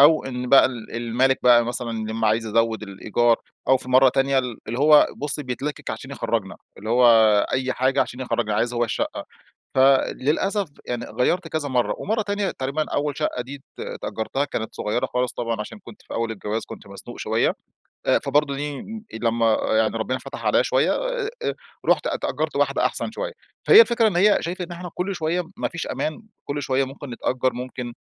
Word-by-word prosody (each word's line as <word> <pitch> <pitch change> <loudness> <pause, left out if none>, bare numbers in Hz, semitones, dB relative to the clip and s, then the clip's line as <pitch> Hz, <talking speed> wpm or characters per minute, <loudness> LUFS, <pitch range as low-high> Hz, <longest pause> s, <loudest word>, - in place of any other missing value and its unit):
أو 155 +3 +6
إن 125 -1 -4
بقى 135 +1 +7
ال 120 -3 -7
المالك 120 +3 +1
بقى 120 -1 +6
مثلًا 120 0 -3 0.2
يا - - -3
أمّا 110 -1 +1
عايز 110 +1 +1
يزود 115 0 +1
ال 105 - -7
الإيجار، 115 +4 +1 0.3
أو 130 - +6
في 125 - -10
مرّة 130 +1 +7
تانية 135 +1 +2
ال 125 -3 -3
اللي 120 +3 -3
هو 150 +1 +7
بُصّي 145 0 -3
بيتلكك 135 +3 -4
عشان - - -7
يخرجنا، - - -2 0.2
اللي 110 +3 -5
هو 125 +1 +4 0.5
أي 130 0 0
حاجة 130 +2 +1
عشان 125 - -8
يخرجنا، 115 -4 -1
عايز 120 +3 0
هو 120 0 +2
الشقّة. 110 - -3 0.5
فللأسف 145 +8 +2 0.2
يعني 120 -1 -3
غيرت 165 - 0
كذا 155 -3 -2
مرّة، 125 -2 +1
ومرّة 220 +2 -1
تانية 205 -1 -1
تقريبًا 140 +4 -2
أوّل 145 -1 -1
شقّة 125 - -1
دي 135 +3 -9 0.2
ت - - -6 0.2
تأجرتها 125 +5 -2
كانت 110 -6 -5
صغيّرة 105 +3 -1
خالص 125 0 -1
طبعًا، 115 -2 -3
عشان 105 - -7
كنت 205 - -14
في - - -9
أوّل 115 0 -1
الجواز 110 +1 -4
كنت - - -10
مزنوق 100 0 -10
شويّة، - - +1 0.5
آآ - - +4
فبرضو 140 0 +1
دي 145 0 -4 0.4
لمّا 115 -1 +2
يعني 110 0 +2
ربنا 130 +3 -1
فتح - - -8
عليَّ - - +4
شويّة - - +2
أ - - -2 0.2
أ - - +1 0.3
رُحت - - +3
اتأجرت - - -2
واحدة - - +2
أحسن - - -3
شويّة، - - -4 0.3
فهي 435 - +10
الفكرة 235 - +4
إن 185 - -2
هيّ 205 +3 +5
شايفة 180 +2 -3
إن 175 - -10
إحنا 175 0 -7
كل 190 +2 -2
شويّة 170 +2 -1
ما - - -1
فيش 170 -1 -5
أمان، 155 +6 -3 0.2
كل 145 0 -3
شويّة 135 0 +1
ممكن 135 +1 -9
نتأجر 130 +2 -1
ممكن 125 0 -6
130 Hz, 195 wpm, -23 LUFS, 120-150 Hz, 0.5 s, فهي